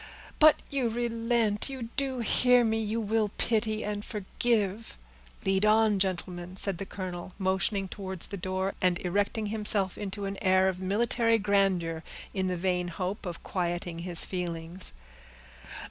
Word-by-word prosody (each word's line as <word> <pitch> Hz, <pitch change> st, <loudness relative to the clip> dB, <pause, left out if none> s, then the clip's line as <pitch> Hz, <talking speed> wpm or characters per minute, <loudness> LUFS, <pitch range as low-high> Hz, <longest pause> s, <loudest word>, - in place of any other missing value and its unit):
But 310 Hz, 0 st, +6 dB
you 265 Hz, -4 st, +1 dB
relent, 230 Hz, -1 st, 0 dB
you 255 Hz, -4 st, -5 dB
do 270 Hz, -3 st, -1 dB
hear 250 Hz, +2 st, +4 dB
me, 225 Hz, 0 st, +1 dB
you 220 Hz, +1 st, -1 dB
will 220 Hz, 0 st, +1 dB
pity 220 Hz, -1 st, 0 dB
and 205 Hz, 0 st, -3 dB
forgive." 210 Hz, 0 st, -1 dB, 0.5 s
"Lead 195 Hz, +1 st, +2 dB
on, 215 Hz, -1 st, +4 dB
gentlemen," 180 Hz, -1 st, -2 dB
said 190 Hz, -2 st, +3 dB
the 195 Hz, -, -5 dB
colonel, 185 Hz, -1 st, -6 dB
motioning 195 Hz, +1 st, +1 dB
towards 190 Hz, -2 st, -5 dB
the 200 Hz, -, -6 dB
door, 190 Hz, +1 st, -2 dB
and 180 Hz, -1 st, +3 dB
erecting 205 Hz, +4 st, 0 dB
himself 205 Hz, -3 st, +1 dB
into 200 Hz, 0 st, -4 dB
an 195 Hz, 0 st, -4 dB
air 185 Hz, 0 st, +4 dB
of 185 Hz, -1 st, -1 dB
military 230 Hz, +4 st, +2 dB
grandeur, 195 Hz, -6 st, +1 dB, 0.3 s
in 190 Hz, -2 st, 0 dB
the 180 Hz, -1 st, -1 dB
vain 180 Hz, 0 st, 0 dB
hope 185 Hz, +3 st, -4 dB
of 175 Hz, -, -6 dB
quieting 175 Hz, -2 st, -2 dB
his 175 Hz, -1 st, +1 dB
feelings. 175 Hz, 0 st, -3 dB
195 Hz, 145 wpm, -29 LUFS, 185-220 Hz, 0.5 s, But